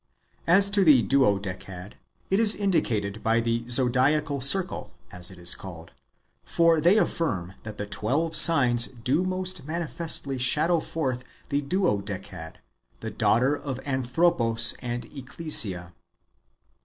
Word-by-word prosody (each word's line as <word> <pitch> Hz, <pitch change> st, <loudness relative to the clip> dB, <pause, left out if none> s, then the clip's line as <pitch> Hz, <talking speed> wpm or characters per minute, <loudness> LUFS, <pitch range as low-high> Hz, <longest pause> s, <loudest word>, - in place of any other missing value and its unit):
As 195 Hz, +4 st, +3 dB
to 200 Hz, -1 st, +3 dB
the 145 Hz, -8 st, +5 dB
Duodecad, 100 Hz, -6 st, -2 dB, 0.4 s
it 195 Hz, -, +2 dB
is 220 Hz, -2 st, +7 dB
indicated 110 Hz, -, -2 dB
by 115 Hz, +1 st, +1 dB
the 115 Hz, +1 st, -3 dB
zodiacal 135 Hz, +4 st, +1 dB
circle, 180 Hz, +8 st, +1 dB, 0.2 s
as 90 Hz, 0 st, -6 dB
it 95 Hz, -, -14 dB
is 85 Hz, 0 st, -1 dB
called; 85 Hz, -3 st, -11 dB, 0.5 s
for 165 Hz, -2 st, +1 dB
they 175 Hz, +7 st, +3 dB
affirm 105 Hz, -, -2 dB
that 110 Hz, -2 st, -10 dB
the 105 Hz, -, -5 dB
twelve 140 Hz, +11 st, -3 dB
signs 125 Hz, -8 st, +6 dB
do 130 Hz, +7 st, -2 dB
most 185 Hz, -4 st, -5 dB
manifestly 160 Hz, -4 st, -4 dB
shadow 165 Hz, +7 st, +1 dB
forth 130 Hz, -6 st, -4 dB, 0.3 s
the 140 Hz, 0 st, -1 dB
Duodecad, 100 Hz, -, -4 dB, 0.5 s
the -, -, -6 dB
daughter 130 Hz, +6 st, +1 dB
of 135 Hz, -3 st, -7 dB
Anthropos 125 Hz, -4 st, +2 dB
and 120 Hz, -1 st, -5 dB
Ecclesia. 120 Hz, -, -1 dB
130 Hz, 125 wpm, -25 LUFS, 105-165 Hz, 0.5 s, is